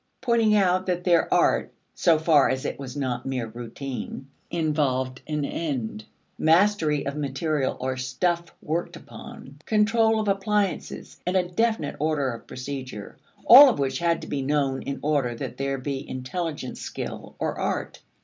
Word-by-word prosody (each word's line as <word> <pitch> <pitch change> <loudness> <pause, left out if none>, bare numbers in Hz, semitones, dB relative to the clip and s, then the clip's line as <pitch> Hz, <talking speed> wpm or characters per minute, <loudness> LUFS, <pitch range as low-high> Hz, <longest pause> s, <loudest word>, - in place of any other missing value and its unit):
pointing 230 -4 +3
out 185 -2 +2
that 180 -1 -1
their 175 -2 +3
art - - +2 0.2
(so 165 -2 +3
far 155 -5 +4
as 130 +1 -2
it - - -3
was 135 -1 -7
not 130 -3 -2
mere 130 -3 -2
routine) 120 +4 -7 0.2
involved 140 -6 0
an 150 -2 -1
end, 125 -10 -3 0.4
mastery 165 -3 +3
of 140 +1 -3
material 145 0 -1
or 130 0 -2
stuff 170 +7 -1 0.2
worked 170 +2 -2
upon, 135 +1 -11
control 220 +1 +3
of 215 - -2
appliances, 200 0 -1
and 185 +1 +2
a 180 -1 +1
definite 220 -4 0
order 145 -3 0
of 115 - -11
procedure 130 -5 -7 0.3
all 275 +4 +11
of - - -1
which 135 -2 -1
had 170 -1 +1
to - - -7
be 140 - -2
known 135 -1 0
in 140 - -4
order 140 -5 +1
that - - -6
there 135 0 -1
be 135 +1 -5
intelligent 130 +2 -4
skill - - -6
or - - -2
art. - - -3
150 Hz, 160 wpm, -25 LUFS, 130-180 Hz, 0.4 s, all